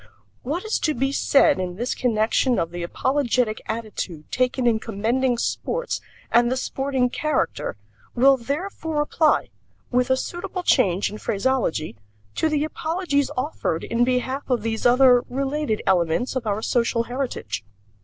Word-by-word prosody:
What 320 - -3
is 435 - 0
to 310 - 0
be 270 +3 0
said 275 -6 +4
in 180 -1 -3
this 240 +6 -2
connection 235 +1 +1
of 165 0 -1
the 175 0 -5
apologetic 245 +3 0
attitude 210 -8 -5
taken 255 0 0
in 230 -2 +3
commending 235 +4 0
sports 485 - -2 0.3
and 240 +1 +4
the 260 - 0
sporting 265 -1 0
character 305 - -1 0.4
will 270 +3 +6
therefore 305 +4 -3
apply, 310 +1 +2 0.4
with 250 0 +2
a 260 - +3
suitable 360 +5 -4
change 200 - +2
in 210 - -7
phraseology, 200 - -1 0.4
to 320 - +1
the 300 -1 +1
apologies 315 -2 -1
offered 255 - -2
in 235 +1 +1
behalf 255 +3 -1
of 245 -4 +1
these 225 +1 +1
other, 250 0 +6
related 275 -3 -1
elements 180 +7 +1
of 245 -4 -2
our 210 +1 -1
social 235 -1 +1
heritage. 250 - -4
250 Hz, 145 wpm, -23 LUFS, 225-280 Hz, 0.4 s, will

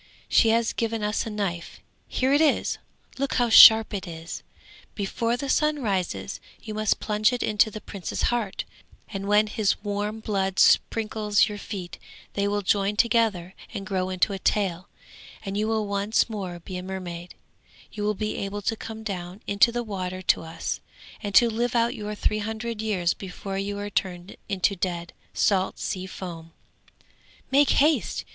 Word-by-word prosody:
She 225 - +4
has 230 0 +2
given 225 -1 -2
us 210 +2 -1
a - - -3
knife; 195 -5 -4 0.3
here 260 +2 +1
it 290 - +4
is, 310 -3 +2 0.4
look 275 -1 -1
how 245 -1 +2
sharp 220 -1 +9
it 195 -3 -4
is! 165 0 -7 0.5
Before 230 +4 -1
the 275 - -4
sun 300 0 +1
rises, 195 -1 -2 0.2
you 215 - -7
must 215 -1 +1
plunge 215 +2 +2
it 245 - -2
into 215 0 +3
the 215 0 -8
prince's 195 -4 -5
heart, 220 -5 -2 0.5
and 195 -2 -5
when 210 +1 +5
his 210 -1 0
warm 205 +1 -2
blood 195 -3 -1
sprinkles 215 -2 +3
your 210 -2 -6
feet 185 -5 -7 0.3
they 200 0 0
will 205 0 -1
join 200 +1 +1
together 210 -5 +2 0.2
and 195 - -4
grow 185 -3 -1
into 185 +2 +1
a 195 - -4
tail, 185 -2 0 0.6
and 195 0 -4
you 210 +1 0
will 220 -1 0
once 200 +2 +1
more 190 -6 -5
be 180 +2 -7
a - - -4
mermaid; 180 -2 -7 0.6
you 210 - -6
will 210 0 0
be 215 +1 -3
able 200 +1 -4
to 225 - 0
come 220 0 -8
down 185 -1 -6
into 200 +4 +4
the 240 0 -2
water 185 -3 -4
to - - +3
us, 165 0 -4 0.4
and 205 -2 -4
to 240 - +8
live 235 +2 -1
out 235 +1 +2
your 210 -4 -5
three 215 +1 0
hundred 220 +1 -4
years 190 -6 +1
before 195 +1 -6
you 200 +1 -3
are 205 0 -5
turned 180 -1 -3
into 195 0 +1
dead, 175 -2 -3 0.2
salt 190 -2 +2
sea 185 0 -4
foam. 165 -3 -8 1.0
Make 280 +1 +5
haste! 300 +2 +2
205 Hz, 175 wpm, -25 LUFS, 190-220 Hz, 1.0 s, sharp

